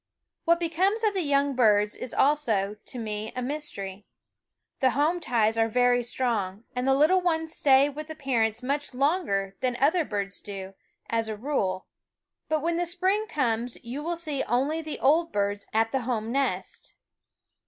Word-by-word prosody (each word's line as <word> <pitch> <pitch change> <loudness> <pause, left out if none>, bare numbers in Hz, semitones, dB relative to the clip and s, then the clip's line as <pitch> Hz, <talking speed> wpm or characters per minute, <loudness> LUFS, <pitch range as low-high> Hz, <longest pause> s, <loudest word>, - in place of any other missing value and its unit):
What 340 0 +4
becomes 375 +6 +1
of 430 -2 +3
the 380 - 0
young 280 -2 +2
birds 210 -4 +3
is 250 - -5
also, 225 -9 +2
to - - -5
me, 215 -1 -4
a 255 - -2
mystery. 210 -9 -5 0.7
The 260 - +4
home 315 +5 +2
ties 225 -6 +1
are 225 - +4
very 245 +1 +3
strong, 230 -5 -2
and 250 +1 -1
the 270 - +4
little 320 +7 +4
ones 320 -2 -1
stay 275 0 +5
with 300 +1 -6
the 315 - -7
parents 240 -5 0
much 280 0 -2
longer 255 - 0
than 255 -2 0
other 320 +6 +3
birds 200 -6 -4
do, 195 -1 -7 0.3
as 225 -1 -1
a 215 - -4
rule; 205 -7 -1 0.6
but 310 -1 0
when 335 0 0
the 350 0 0
spring 375 +5 +1
comes 245 - -1
you 245 +5 -5
will 340 +3 -2
see 310 -5 -2
only 280 +7 0
the 310 -1 -5
old 330 +4 +3
birds 205 0 -1
at 225 +1 +1
the 265 - 0
home 230 -2 -2
nest. 275 +1 -2
260 Hz, 175 wpm, -27 LUFS, 220-310 Hz, 0.7 s, stay